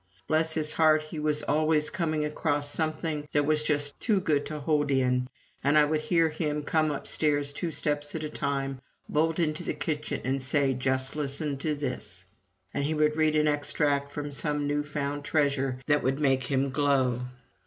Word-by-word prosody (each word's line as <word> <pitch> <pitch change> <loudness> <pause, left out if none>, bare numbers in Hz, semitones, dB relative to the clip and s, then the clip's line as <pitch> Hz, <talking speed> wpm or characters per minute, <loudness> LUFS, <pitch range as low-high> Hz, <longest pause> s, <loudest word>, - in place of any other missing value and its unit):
Bless 160 +3 +2
his 155 -1 +4
heart, 155 -1 +4
he 155 0 -7
was 150 0 +1
always 155 0 +2
coming 155 -4 -1
across 145 -1 -1
something 155 -1 -2
that 145 -1 +3
was 155 0 +2
just 145 -2 +1
too 215 -4 +2
good 155 -6 0
to 155 - -5
hold 145 0 0
in, 125 -2 +1 0.4
and 145 +2 +3
I 150 - +6
would 155 +1 0
hear 165 0 +2
him 150 -1 -2
come 155 +1 +1
upstairs 145 0 0
two 170 +3 -3
steps 145 -2 -1
at 160 - -3
a 155 - -3
time, 135 -2 -3 0.3
bolt 160 +2 +1
into 155 -3 0
the - - -3
kitchen, 150 0 -2
and 135 +1 -1
say: 135 0 +2
"Just 130 +1 0
listen 145 0 -1
to 150 +2 -1
this!" 125 -10 -4 0.5
And 140 - -1
he 155 +2 0
would 150 0 +2
read 155 -1 +2
an 150 0 +3
extract 145 -1 0
from 145 0 -5
some 145 +1 0
new 145 0 0
found 145 -1 -4
treasure 140 -4 0
that 145 -1 +2
would 135 +2 0
make 135 -3 +2
him 135 0 0
glow. 135 -3 +1
150 Hz, 185 wpm, -28 LUFS, 140-155 Hz, 0.5 s, I